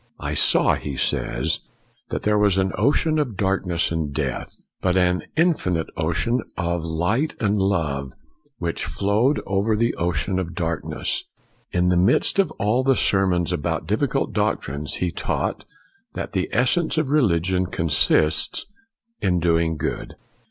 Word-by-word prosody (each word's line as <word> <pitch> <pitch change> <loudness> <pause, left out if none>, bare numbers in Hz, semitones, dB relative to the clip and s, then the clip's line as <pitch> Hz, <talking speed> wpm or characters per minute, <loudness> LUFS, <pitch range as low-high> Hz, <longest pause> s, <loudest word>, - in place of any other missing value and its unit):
" - - -39
I - - -2
saw,' - - +4
1 - - -9
he 70 - -4
says, - - 0 0.3
" - - -40
that - - -3
there 105 0 +2
was 100 -2 +3
an 95 0 +1
ocean 155 +2 +2
of 125 -9 -2
darkness 95 -4 0
and 80 -3 -2
death; 70 - -4 0.2
but 90 0 +2
an 90 0 +2
infinite 120 - +1
ocean 85 +10 0 0.2
of 85 -2 -1
light 90 - 0
and 105 -2 +1
love, 75 -9 0 0.5
which - - -2
flowed 110 +8 +1
over 100 +3 +1
the 115 +2 +1
ocean 90 +2 -1
of 85 -2 -5
darkness. 80 -3 -2 0.2
" - - -38 0.2
In 90 0 +2
the 90 - +3
midst 95 - +3
of 190 -5 +3
all 110 +6 +1
the 135 0 +3
sermons 95 -6 +2
about 75 - -2
difficult - - 0
doctrines, 70 +2 -1
he 90 -1 -1
taught - - -2 0.5
that - - -5
the - - -1
essence 155 +8 +1
of 150 -3 0
religion 95 - +2
consists 80 -1 +1 0.6
in 90 -2 +2
doing 85 -1 +1
good. 70 - -4
90 Hz, 155 wpm, -23 LUFS, 85-105 Hz, 0.6 s, saw